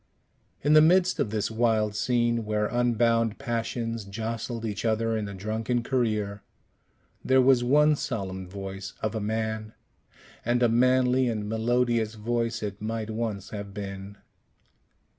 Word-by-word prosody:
In 145 Hz, +2 st, +4 dB
the 155 Hz, -, +8 dB
midst 180 Hz, +3 st, +4 dB
of 115 Hz, -, +1 dB
this 110 Hz, 0 st, -1 dB
wild 110 Hz, -2 st, +1 dB
scene, 120 Hz, +1 st, +1 dB
where 105 Hz, 0 st, 0 dB
unbound 115 Hz, -1 st, +1 dB
passions 115 Hz, -1 st, -3 dB
jostled 115 Hz, +3 st, -4 dB
each 105 Hz, -2 st, -3 dB
other 115 Hz, 0 st, +1 dB
in 105 Hz, -2 st, -2 dB
a 100 Hz, -, -7 dB
drunken 110 Hz, +4 st, -2 dB
career, 110 Hz, -5 st, -1 dB, 0.8 s
there 130 Hz, 0 st, +4 dB
was 130 Hz, -1 st, +5 dB
one 150 Hz, +4 st, +4 dB
solemn 95 Hz, -9 st, -4 dB
voice 95 Hz, 0 st, -7 dB
of 110 Hz, -1 st, 0 dB
a 110 Hz, -, -2 dB
man, 110 Hz, 0 st, -2 dB, 0.7 s
and 120 Hz, +1 st, +1 dB
a 120 Hz, -, +5 dB
manly 125 Hz, +2 st, +3 dB
and 110 Hz, -3 st, -2 dB
melodious 115 Hz, 0 st, +1 dB
voice 115 Hz, +1 st, -2 dB
it 100 Hz, -1 st, -5 dB
might 110 Hz, 0 st, -3 dB
once 110 Hz, -3 st, -4 dB
have 100 Hz, -1 st, -7 dB
been. 100 Hz, 0 st, -7 dB
115 Hz, 140 wpm, -27 LUFS, 105-120 Hz, 0.8 s, the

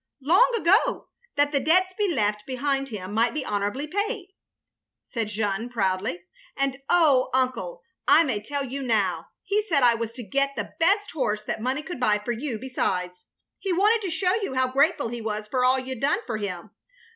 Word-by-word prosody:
"Long 365 Hz, -, +5 dB
ago, 395 Hz, +1 st, +2 dB, 0.3 s
that 290 Hz, 0 st, +2 dB
the 280 Hz, -, +2 dB
debts 370 Hz, +5 st, +3 dB
he 410 Hz, -3 st, +1 dB
left 210 Hz, -6 st, 0 dB
behind 275 Hz, +1 st, -1 dB
him 200 Hz, -3 st, -6 dB
might 230 Hz, +4 st, +2 dB
be 300 Hz, -, -2 dB
honourably 205 Hz, +7 st, -2 dB
paid, 405 Hz, +3 st, -3 dB, 0.4 s
" -, -, -63 dB, 0.3 s
said 230 Hz, -3 st, -3 dB
Jeanne, 210 Hz, +1 st, -2 dB
proudly, 185 Hz, -6 st, -1 dB, 0.3 s
"and 275 Hz, -1 st, -1 dB
oh 295 Hz, -7 st, +4 dB
— -, -, -26 dB
^Uncle, 260 Hz, -, -1 dB, 0.3 s
I 330 Hz, -, +7 dB
naay 245 Hz, -9 st, -1 dB
tell 285 Hz, +3 st, -3 dB
you 275 Hz, +2 st, -5 dB
now, 215 Hz, -8 st, 0 dB, 0.2 s
he 405 Hz, +2 st, +1 dB
said 320 Hz, -11 st, +1 dB
I 240 Hz, -1 st, +6 dB
was 230 Hz, 0 st, -4 dB
to 245 Hz, 0 st, -8 dB
get 275 Hz, +6 st, 0 dB
the -, -, -5 dB
best 400 Hz, +5 st, +2 dB
horse 215 Hz, -8 st, -1 dB
that 215 Hz, -, -3 dB
money 260 Hz, +5 st, -1 dB
could 355 Hz, -5 st, -7 dB
buy 210 Hz, -4 st, +3 dB
for 210 Hz, +3 st, -4 dB
you 240 Hz, 0 st, -3 dB
besides. 180 Hz, -7 st, -3 dB, 0.3 s
He 390 Hz, -, -2 dB
wanted 420 Hz, +5 st, +3 dB
to 385 Hz, -, -3 dB
show 365 Hz, +2 st, +1 dB
you 390 Hz, -10 st, -3 dB
how 260 Hz, 0 st, +1 dB
grateful 285 Hz, -1 st, +2 dB
he 240 Hz, 0 st, -5 dB
was 215 Hz, -1 st, -3 dB
for 250 Hz, +3 st, 0 dB
all 255 Hz, +1 st, +4 dB
you 260 Hz, 0 st, -4 dB
*d 255 Hz, -, -9 dB
done 280 Hz, +2 st, +2 dB
for 225 Hz, -3 st, -3 dB
him. 200 Hz, -1 st, -5 dB
260 Hz, 205 wpm, -25 LUFS, 215-320 Hz, 0.4 s, I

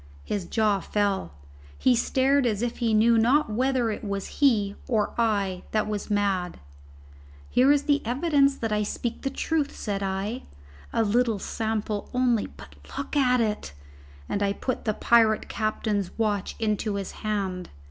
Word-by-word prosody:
His 195 Hz, -, -3 dB
jaw 210 Hz, 0 st, +1 dB
fell; 200 Hz, -1 st, -1 dB, 0.5 s
he 255 Hz, -, +3 dB
stared 265 Hz, +2 st, +2 dB
as 215 Hz, -1 st, -1 dB
if 240 Hz, -, -2 dB
he 235 Hz, -2 st, 0 dB
knew 225 Hz, +2 st, +4 dB
not 250 Hz, +2 st, +3 dB
whether 250 Hz, 0 st, +1 dB
it -, -, -5 dB
was 200 Hz, -2 st, -3 dB
he 215 Hz, -8 st, +3 dB
or 220 Hz, -5 st, +1 dB
I 200 Hz, -5 st, 0 dB
that 215 Hz, -, +2 dB
was 210 Hz, 0 st, -4 dB
mad. 195 Hz, -4 st, 0 dB, 0.9 s
"Here 255 Hz, +3 st, +5 dB
is 290 Hz, 0 st, +2 dB, 0.2 s
evidence 275 Hz, +2 st, +2 dB
that 225 Hz, -1 st, -3 dB
I 210 Hz, 0 st, +1 dB
speak 230 Hz, +3 st, -3 dB
the 270 Hz, -, -1 dB
truth," 295 Hz, +1 st, -1 dB
said 200 Hz, -2 st, -3 dB
I. 195 Hz, +5 st, -2 dB, 0.5 s
"A 225 Hz, -, +2 dB
little 230 Hz, +1 st, +2 dB
sample 215 Hz, 0 st, -3 dB
only 245 Hz, -4 st, +2 dB
but -, -, -14 dB, 0.2 s
look 280 Hz, +2 st, -4 dB
at 250 Hz, -3 st, +3 dB
it!" 210 Hz, -, -2 dB, 0.5 s
And 205 Hz, -, -2 dB
I 200 Hz, 0 st, +1 dB
put 255 Hz, +4 st, -3 dB
the 215 Hz, -2 st, 0 dB
pirate 225 Hz, -2 st, +3 dB
captain's 215 Hz, -3 st, -1 dB
watch 210 Hz, -3 st, -1 dB
into 215 Hz, -1 st, -1 dB
his 195 Hz, -1 st, -4 dB
hand. 195 Hz, -4 st, -2 dB
220 Hz, 160 wpm, -26 LUFS, 205-245 Hz, 0.9 s, Here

